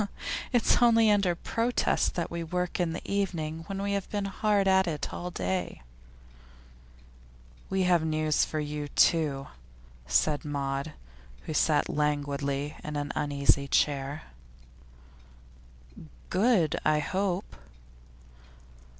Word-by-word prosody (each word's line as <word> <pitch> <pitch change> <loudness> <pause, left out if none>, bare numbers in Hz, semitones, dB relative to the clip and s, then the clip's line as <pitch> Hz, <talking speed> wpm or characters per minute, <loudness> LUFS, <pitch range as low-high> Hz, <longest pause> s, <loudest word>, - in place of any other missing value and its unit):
'It's 245 -1 +3
only 230 -2 +5
under 200 -4 +2
protest 230 +7 0
that 170 - -2
we 170 0 -3
work 180 +2 -2
in 175 -2 +1
the - - -5
evening 165 -5 -2
when 195 -1 -4
we 200 0 -1
have 200 -1 -2
been 205 -1 -2
hard 200 0 +1
at 190 -1 +4
it 155 -3 -3
all 180 - -4
day.' 90 - -3 1.9
'We 190 0 +1
have 175 -3 +3
news 155 -1 +1
for 155 - -2
you, 150 0 -4
too,' 145 -2 +2 0.6
said 145 - +2
Maud, 140 0 -3 0.5
who 155 - -5
sat 150 0 +2
languidly 145 -1 -1
on 150 - -5
an 145 -1 -2
uneasy 140 -1 +1
chair. 140 +1 0 2.1
'Good, 190 -7 +2
I 155 0 +3
hope? 185 +4 -2
160 Hz, 115 wpm, -28 LUFS, 145-190 Hz, 2.1 s, only